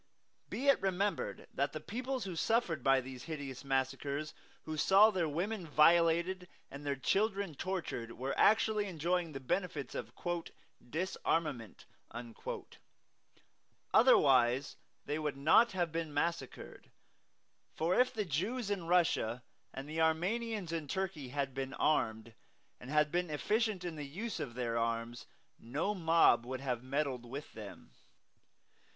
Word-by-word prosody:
Be 265 - -3
it 275 - +5
remembered 195 +1 -1
that - - -1
the - - -4
peoples 255 +1 -3
who 185 -3 -5
suffered 175 - +1
by 135 -1 +4
these 130 0 -9
hideous 140 -6 -6
massacres, 140 +2 -1 0.3
who 155 - -5
saw 195 +7 +6
their 175 -5 0
women 180 +4 -2
violated 170 +4 +4 0.2
and 140 +1 -8
their 140 -1 -1
children 195 - 0
tortured, 145 -9 -4
were 130 +2 -3
actually 215 -1 +3
enjoying 175 0 0
all 155 - -11
the 135 - -5
benefits 150 +1 -2
of - - -5 0.8
"disarmament." 155 - -2 2.1
Otherwise 130 0 +5 0.3
they 150 +2 -2
would 150 -3 -2
not 165 +11 +5
have 175 -3 0
been 165 -1 -3
massacred; 150 -2 -3 0.9
for 165 +3 +1
if 250 +5 +4
the 210 -2 -2
Jews 200 - -2
in 185 -5 -2
Russia 160 -9 +2 0.3
and 135 +1 -7
the 160 +2 -2
Armenians 185 +4 0
in 160 -3 -3
Turkey 185 -5 -3
had 140 0 -2
been 135 0 -4
armed, 110 -6 0 0.5
and 125 - -10
had 150 0 +3
been 175 0 0
efficient 210 +5 0
in 170 -3 -4
the 145 -1 -5
use 205 +8 -5
of 130 -6 -5
their 115 -2 -1
arms, 115 +1 -2 0.3
no 145 - -2
mob 165 - +4
would 130 +2 -5
have 125 -3 -2
meddled 135 -1 -2
with 135 +5 -8
them. 105 -2 -10
155 Hz, 140 wpm, -34 LUFS, 135-185 Hz, 2.1 s, saw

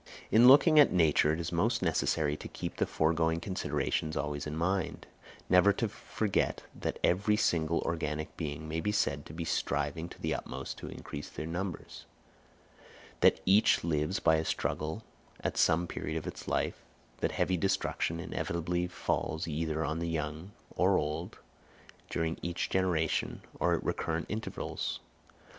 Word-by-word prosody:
In 115 +3 +7
looking 145 +4 +8
at 145 - +7
Nature, 80 -3 +4
it 80 - -2
is 85 0 -3
most 110 +6 +1
necessary 75 -3 +1
to - - -8
keep - - -6
the - - +1
foregoing 80 +1 +1
considerations 85 -3 -2
always 75 +1 -2
in 75 - -4
mind—never 90 +1 +1
to 115 - -1
forget 105 0 -1
that - - -3
every 100 +4 +3
single 85 -5 +1
organic 80 -2 -3
being 80 -1 -4
may 80 +1 -2
be 105 - 0
said 70 -8 0
to - - -10
be 85 0 -3
striving 75 +3 -1
to - - -12
the - - -1
utmost 65 +1 -5
to - - -7
increase 70 - -8
in 80 +1 -4
numbers; 90 0 -5 1.1
that - - +5
each 100 +3 +5
lives 75 +2 0
by 80 - +4
a 80 - 0
struggle 80 +5 -2 0.4
at - - -2
some 85 +2 +3
period 80 -1 -4
of 80 - -5
its - - -7
life; - - -1 0.4
that - - 0
heavy 95 - +1
destruction 85 -2 0
inevitably 85 +1 -2
falls 80 -2 -2
either 80 0 -1
on 80 +2 -2
the 85 0 -2
young 80 +2 -3 0.3
or - - +4
old 75 +3 -3 0.7
during 80 -1 -1
each 85 0 -2
generation 90 -4 0 0.2
or - - +3
at - - -4
recurrent 80 0 -1
intervals. 110 +1 -3
80 Hz, 155 wpm, -31 LUFS, 80-90 Hz, 1.1 s, looking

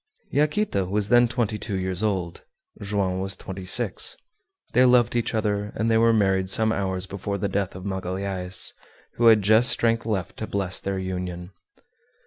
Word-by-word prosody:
Yaquita 150 - +1
was 100 +2 -1
then 120 +1 +5
twenty 115 -3 -2
two 100 -2 -4
years 95 0 -2
old, 95 -6 -2 0.4
Joam 100 -2 -1
was 95 0 -2
twenty 95 -1 -8
six. 90 - +1 0.6
They 125 - +5
loved 125 -2 +4
each 120 -1 -1
other 105 -1 -1
and 115 +1 0
they 110 - +4
were 115 0 +5
married 95 -4 +2
some 110 +3 +2
hours 95 -3 -1
before 100 +1 -4
the 100 - -1
death 100 -1 -2
of 90 - -8
Magalhaës, 95 -1 -2 0.4
who 120 - +4
had 110 -3 +6
just 110 +5 +4
strength 115 0 +1
left 95 -6 -3
to 110 - -5
bless 95 -2 -2
their 100 0 -3
union. 90 -1 -5
100 Hz, 170 wpm, -24 LUFS, 95-110 Hz, 0.6 s, had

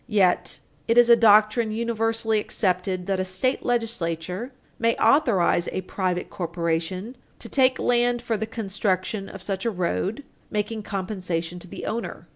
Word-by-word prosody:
Yet 195 -5 +2 0.3
it 230 - +2
is 240 0 +7
a - - +10
doctrine 215 0 +5
universally 225 0 0
accepted 185 -3 -1
that 195 -1 -1
a - - +1
state 185 +8 -1
legislature 220 - -2 0.3
may 230 0 +2
authorize 220 - +3
a - - -2
private 185 -1 -2
corporation 170 +5 -3 0.2
to - - -7
take 260 -1 +3
land 245 0 +2
for 235 -1 -2
the 220 +1 -3
construction 195 -2 -2
of 195 - -9
such 190 -1 -3
a 235 - +1
road, 195 +6 -2 0.3
making 215 +1 -2
compensation 185 -4 -3
to 180 - -12
the - - -7
owner. 215 -6 -4
210 Hz, 150 wpm, -24 LUFS, 185-230 Hz, 0.3 s, a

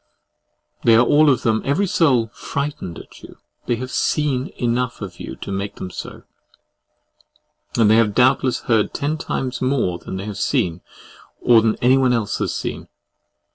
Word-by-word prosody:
They 115 - +6
are 120 +2 +5
all 150 +4 +5
of 130 - +2
them, 110 -1 +1
every 155 +9 +1
soul, 130 - +2
frightened 140 - -5
at - - -13
you; - - -13 0.3
they 120 - +1
have 130 +2 -6
SEEN 140 -3 0
enough 120 0 -1
of 95 -5 -8
you - - -7
to - - -8
make 100 +1 -4
them 90 - -7
so; - - -8 1.5
and 115 -2 +5
they 110 +1 +5
have 105 -3 +2
doubtless 130 0 +3
heard 110 -3 +1
ten 150 +2 -2
times 130 -4 -3
more 130 -10 0
than 95 - -7
they 95 - -5
have 105 -2 -6
seen, 85 0 0 0.6
or 115 -2 +5
than 110 -1 +1
anyone 130 0 +4
else 115 -4 -1
has - - -1
seen. - - -5
120 Hz, 170 wpm, -20 LUFS, 105-135 Hz, 1.5 s, They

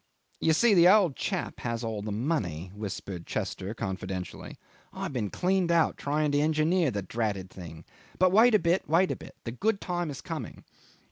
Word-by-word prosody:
"You 160 - +3
see, 230 +7 +4
the 175 -2 +7
old 185 -7 +5
chap - - -3
has 115 0 -3
all 110 -2 -3
the 105 +1 -4
money," 100 - -2
whispered 100 -4 -6
Chester 100 +4 -3
confidentially. 95 -3 -5 0.3
"I've - - -5
been 110 -6 -1
cleaned 185 - +1
out 170 -1 +3
trying 150 +1 0
to 145 - +2
engineer 155 +2 +2
the 100 -5 -3
dratted 100 -2 -3
thing. 80 -3 -10 0.3
But 185 0 +4
wait 225 +4 +6
a - - +8
bit, 170 -1 0
wait 175 +4 +3
a - - -1
bit. - - -12
The 115 - -4
good 200 - 0
time 175 -4 -2
is 140 - -6
coming." - - -6
140 Hz, 185 wpm, -28 LUFS, -, 0.3 s, a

